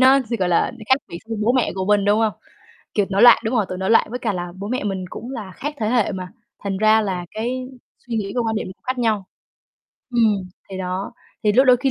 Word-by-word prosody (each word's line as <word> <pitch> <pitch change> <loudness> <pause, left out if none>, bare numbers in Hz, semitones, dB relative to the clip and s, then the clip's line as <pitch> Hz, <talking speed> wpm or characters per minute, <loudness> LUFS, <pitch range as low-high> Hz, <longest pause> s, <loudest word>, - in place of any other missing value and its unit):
nó 260 +1 +7
sẽ, 235 - +1
gọi 185 -4 0
là, 175 +6 +2 0.2
khác 260 - +6
biệt 170 - -7
với 225 - -3
bố 230 +3 +3
mẹ 255 -3 +1
của 190 0 -2
mình 205 -1 +3
đúng 205 +1 +3
hông? 220 -1 +2 0.6
Kiểu 205 -2 +2
nổi 200 +2 +2
loạn 245 - +9
đúng 220 +3 -1
hông? 220 -4 +3
Tuổi 185 - -5
nổi 190 +2 -1
loạn. 225 - +5
Với 245 - -3
cả 225 -4 -1
là 175 -2 -4
bố 200 +1 -5
mẹ 255 -1 -2
mình 195 -2 -2
cũng 240 - -7
là 210 -8 -6
khác 295 +2 -4
thế 215 - 0
hệ 235 -3 +2
mà, 185 -1 -5 0.4
thành 195 -1 -1
ra 215 +2 +5
là 185 -4 -2
cái 255 +3 -3 0.4
suy 240 - -4
nghĩ 200 -2 -2
với 245 - +1
quan 225 -1 -1
điểm - - -2
cũng 185 - -11
khác 255 0 -1
nhau. 215 -5 +1 0.8
Ừm, 225 -4 +3 0.3
thì 190 - -5
đó. 185 +3 -3 0.3
Thì 210 - +4
lúc 260 +5 +5
đôi 250 -1 +7
khi 265 +2 0
215 Hz, 260 wpm, -21 LUFS, 195-245 Hz, 0.8 s, loạn